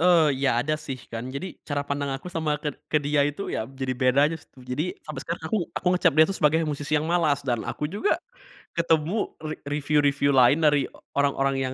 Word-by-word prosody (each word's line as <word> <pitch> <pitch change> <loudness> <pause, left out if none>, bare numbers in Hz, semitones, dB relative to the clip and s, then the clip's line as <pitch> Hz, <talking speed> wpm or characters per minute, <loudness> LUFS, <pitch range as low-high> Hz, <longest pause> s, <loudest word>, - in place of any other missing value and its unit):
Eee, 165 -4 +5
ya 130 - +3
ada 155 +1 0
sih 135 -2 -5 0.2
kan. 115 +3 -4
Jadi 185 +6 -6
cara 145 -1 0
pandang 140 0 -2
aku 180 +7 -9
sama 155 -2 0
ked 150 - -1 0.2
ke 155 - +1
dia 145 0 +2
itu 145 +7 -4
ya 110 - -2
jadi 130 -1 -3
beda 130 +2 +3
aja - - -3
sih - - -22
tuh. 130 -1 -17
Jadi 145 +8 -3
sampai 150 -4 -6
sekarang, 170 0 -4
aku 220 - +1 0.2
aku - - -4
ngecap - - +3
dia 155 - +8
tuh 195 - -3
sebagai 155 +2 +4
musisi 145 0 -4
yang 150 - 0
malas, 155 -5 +2
dan 120 -4 0
aku 150 - -3
juga 210 - +1 0.6
ketemu 170 +4 +1
re 155 0 -4
review-review 145 -1 +2
lain 130 +5 +5
dari 150 -2 +4 0.3
orang-orang 135 -1 +2
yang 130 -1 -2
145 Hz, 215 wpm, -25 LUFS, 135-160 Hz, 0.6 s, dia